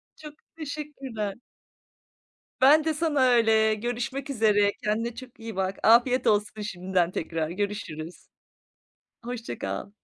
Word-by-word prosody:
Çok 300 -2 -11 0.2
teşekkürler. 275 -9 -5 1.3
Ben 300 +4 +7
de 320 -1 0
sana 300 -3 0
öyle. 220 -2 +4
Görüşmek 245 +5 -4
üzere. 210 -5 +3
Kendine 225 +3 -1
çok 250 -2 -11
iyi 225 -3 -7
bak. 190 0 -2
Afiyet 240 +3 +5
olsun 210 0 +1
şimdiden 185 -3 -1
tekrar. 160 -2 -3
Görüşürüz. 180 -4 -5 1.0
Hoşça 240 -1 -5
kal. 200 - -4
225 Hz, 115 wpm, -26 LUFS, 205-260 Hz, 1.3 s, Ben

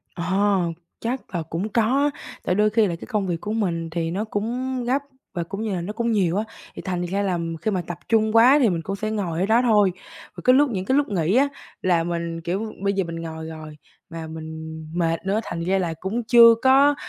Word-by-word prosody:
Ờ, 190 +3 +1 0.4
chắc 245 -2 -4
là 170 - 0
cũng 165 +6 -3
có, 250 +7 +2 0.3
tại 180 - +1
đôi 210 +1 +3
khi 220 0 +3
là 170 - -2
cái - - -10
công 210 -5 -1
việc 170 -2 -2
của 210 - -4
mình 170 -7 -1
thì 165 0 -2
nó 200 +5 -2
cũng 245 +5 -2
gấp 260 +4 +1 0.3
và 175 - -1
cũng 200 +5 -5
như 210 -4 -2
là 175 - -2
nó 195 +5 -4
cũng 235 +1 -1
nhiều 185 -4 +2
á. 210 - 0 0.3
Thì - - -7
thành 180 -2 -2
ra 195 +3 -1
là 185 -3 0 0.2
khi 215 - +1
mà 185 -3 -1
tập 175 -1 -6
trung 220 -1 +3
quá 255 +5 +7
thì 230 - +5
mình 170 -3 -1
cũng 195 +4 -4
sẽ 215 +2 -3
ngồi 185 -6 -2
ở 190 - +2
đó 230 +4 +4
thôi, 210 -6 +4 0.4
và - - -7
cái 255 - +6
lúc 285 0 +4
những 190 -5 -2
cái 260 +7 +2
lúc 290 0 +2
nghỉ 185 +1 +1
á 280 +2 +4 0.3
là 175 -3 +2
mình 170 -1 -3
kiểu 195 +6 -3
bây 200 0 +2
giờ 195 -2 0
mình 165 0 -6
ngồi 160 -1 -6
rồi 155 -1 -9 0.3
mà 165 -1 -6
mình 160 0 -7 0.2
mệt 165 +1 -1
nữa 200 +3 +1
thành 170 - -5
ra 190 +2 +2
là 170 -3 -1
cũng 220 +5 -2
chưa 230 -1 +8
có, 275 +2 +6
195 Hz, 240 wpm, -23 LUFS, 170-225 Hz, 0.4 s, chưa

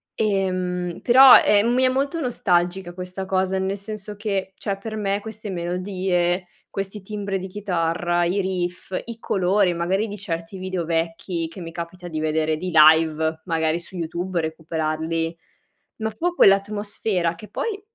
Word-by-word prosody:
ehm, 185 -4 -1
però, 260 +2 +9
ehm, 205 +2 +4
mi 255 - +3
è 255 - +5
molto 275 +5 -1
nostalgica 180 - 0
questa 185 +1 -6
cosa, 190 0 0
nel 190 +1 -1
senso 205 0 -7
che, 195 -3 -2
cioè 200 -1 -3
per 220 +2 -6
me 200 -1 -1
queste 215 -1 -7
melodie, 180 0 -1 0.2
questi 195 +1 -5
timbri 200 -1 -3
di 190 - -6
chitarra, 175 -3 0
i 185 +4 +1
riff, 180 -1 -3
i 230 -1 -7
colori 190 -2 +2
magari 190 +6 0
di 205 0 -7
certi 170 -1 -5
video 185 -1 -3
vecchi 165 +1 -2
che 175 +3 -10
mi 165 -1 -7
capita 175 +1 -7
di 155 - -3
vedere, 155 0 0
di 180 +2 -4
live, 160 0 +5
magari 165 -1 0
su 175 +2 -11
YouTube, 175 +1 -2
recuperarli, 160 +1 -2 0.6
ma 220 0 -2
fu 340 +11 -1
quell'atmosfera 200 - +2
che 210 +6 -11
poi 405 -3 -3
185 Hz, 155 wpm, -23 LUFS, 170-205 Hz, 0.6 s, però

